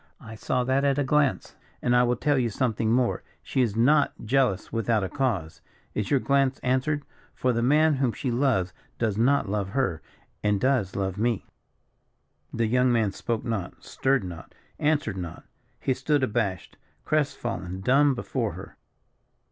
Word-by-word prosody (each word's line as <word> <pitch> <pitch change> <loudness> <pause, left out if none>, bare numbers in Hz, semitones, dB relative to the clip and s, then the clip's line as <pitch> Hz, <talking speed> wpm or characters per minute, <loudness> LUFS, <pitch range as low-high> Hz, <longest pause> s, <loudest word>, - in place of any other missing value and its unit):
I 110 - -10
saw 125 +3 -1
that 130 +2 +1
at 140 -1 +2
a 145 - +2
glance; 140 0 +1 0.2
and 125 0 +1
I 125 - +6
will 125 0 +2
tell 140 +3 +1
you 120 -2 +1
something 110 -1 0
more; 125 0 +1 0.2
she 130 - 0
is 115 -5 0
not 145 +6 +3
jealous 120 -6 +1
without 115 -2 +1
a 95 - -2
cause. 90 - -2 0.3
Is 105 - -2
your 140 - +3
glance 135 0 +2
answered? 130 +3 0 0.3
For 125 -1 +1
the 115 - 0
man 150 +4 +4
whom 130 -3 +1
she 130 +2 -3
loves, 120 -8 +1 0.2
does 110 -4 0
not 120 +2 +2
love 100 -1 -2
her, 95 -9 -1 0.4
and 105 -1 +1
does 130 -7 +1
love 95 0 -2
me." 115 -2 0 1.1
The 115 0 0
young 125 +3 +3
man 110 -4 +2
spoke 115 +4 -3
not, 110 -7 -4
stirred 135 -4 +1
not, 85 -3 -9 0.2
answered 145 -9 +1
not. 85 -3 -6 0.4
He 130 - 0
stood 135 +2 0
abashed, 105 -7 -2 0.3
crest 150 -2 0
fallen, 95 -6 -4
dumb 135 +5 +4
before 120 -4 -2
her. 95 +3 -10
120 Hz, 170 wpm, -26 LUFS, 105-135 Hz, 1.1 s, I